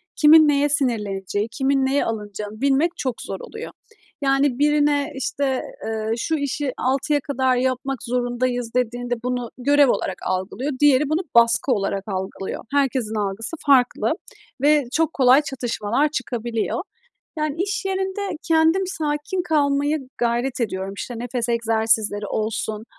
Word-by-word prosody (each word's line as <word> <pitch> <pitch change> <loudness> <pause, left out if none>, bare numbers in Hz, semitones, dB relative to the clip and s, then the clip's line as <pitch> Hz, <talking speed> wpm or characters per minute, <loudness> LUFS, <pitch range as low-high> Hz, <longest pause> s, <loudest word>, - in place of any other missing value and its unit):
kimin 310 +1 +7
neye 290 0 +3
sinirleneceği, 210 -7 -1
kimin 270 +1 +1
neye 275 +2 +1
alınacağını 210 0 -5
bilmek 280 +5 +3
çok 255 -4 -3
zor 195 - -5
oluyor. 445 +2 -8 0.5
Yani, 275 -1 +2
birine, 295 0 +2
işte, 270 0 -1 0.2
eee, 220 0 -2
"Şu 320 +7 -1
işi 285 -2 -2
6'ya 275 +3 +1
kadar 260 -2 0
yapmak 260 +1 -1
zorundayız." 245 -1 -1
dediğinde 245 0 -1
bunu 250 -1 -2
görev 285 +1 +4
olarak - - -1
algılıyor, 190 +10 -2
diğeri 290 0 +4
bunu 320 +4 +1
baskı 235 +3 +4
olarak 195 -3 0
algılıyor. 190 0 -4
Herkesin 260 -6 0
algısı 210 +8 -3
farklı 260 -3 +3 0.5
ve 295 0 +4
çok 325 0 +1
kolay 260 +1 +5
çatışmalar 250 0 -1
çıkabiliyor. 240 0 -2 0.6
Yani, 305 0 -1
iş 395 0 -2
yerinde 385 0 -2
kendim 325 +4 +3
sakin 310 +1 -2
kalmaya 290 -1 +1 0.2
gayret 240 +2 0
ediyorum. 195 -3 -2
İşte, 245 - -5
nefes 245 0 -3
egzersizleri 220 -2 +1
olsun, 220 0 -3
260 Hz, 130 wpm, -22 LUFS, 230-290 Hz, 0.6 s, kimin